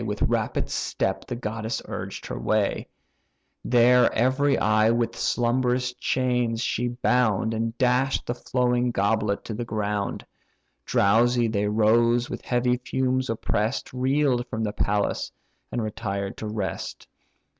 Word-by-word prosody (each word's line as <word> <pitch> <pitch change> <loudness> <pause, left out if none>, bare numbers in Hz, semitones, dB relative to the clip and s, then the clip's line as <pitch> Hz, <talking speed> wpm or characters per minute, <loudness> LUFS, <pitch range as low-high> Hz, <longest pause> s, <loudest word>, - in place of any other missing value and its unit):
With 105 -2 -2
rapid - - 0
step 95 0 -2
the 125 - -3
goddess 110 -1 -3
urged - - -6
her - - -5
way; 110 -2 0 0.8
There 125 +1 +5
every 130 +4 +2
eye 110 +1 +3
with 115 0 0
slumberous 125 +1 0
chains 125 -2 0
she 120 +1 -1
bound, 120 -3 +1
And 115 +1 -2
dash'd 130 +1 +1
the 120 - -2
flowing 125 0 0
goblet 100 -1 0
to 110 - -5
the 115 +3 -3
ground. 105 -2 -3 0.6
Drowsy 120 +4 +3
they 105 -2 0
rose, 115 +3 +3
with - - -5
heavy 125 0 +1
fumes 130 +1 -1
oppress'd, 110 +1 -2
Reel'd 130 -1 +1
from 110 -1 -3
the 105 -1 -2
palace, 105 0 -1 0.4
and 120 - -2
retired 100 -2 -4
to 110 - -5
rest. 105 -3 -4
120 Hz, 135 wpm, -25 LUFS, 110-125 Hz, 0.8 s, There